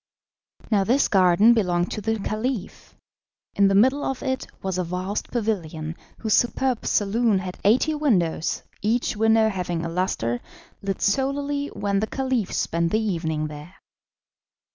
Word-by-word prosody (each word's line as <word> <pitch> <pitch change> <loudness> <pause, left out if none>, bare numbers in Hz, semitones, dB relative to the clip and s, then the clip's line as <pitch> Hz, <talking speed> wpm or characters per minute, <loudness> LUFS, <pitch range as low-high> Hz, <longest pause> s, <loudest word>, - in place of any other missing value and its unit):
Now 200 -2 +4
this 250 +8 +3
garden 190 +4 +5
belonged 180 -5 +1
to 215 - -4
the 220 +2 0
Caliph. 215 +1 -4 0.6
In 200 - +4
the 195 - +2
middle 260 +8 +4
of 270 - -3
it 260 -1 -2 0.2
was 190 -1 -2
a - - +1
vast 180 +4 -3
pavilion, 165 -9 -2 0.2
whose 220 -2 -1
superb 245 0 +1
saloon 215 +1 +2
had 185 -1 -5
eighty 250 +9 +3
windows, 190 - 0 0.2
each 225 +3 0
window 220 +1 +4
having 175 -5 -2
a - - -3
lustre, 165 -10 -1 0.4
lit 195 -1 -3
solely 280 +5 0
when 200 -5 -1
the 215 - -1
Caliph 260 -6 -1
spent 170 0 0
the 215 - +2
evening 165 -7 -1
there. 150 +4 -9
205 Hz, 145 wpm, -24 LUFS, 180-235 Hz, 0.6 s, garden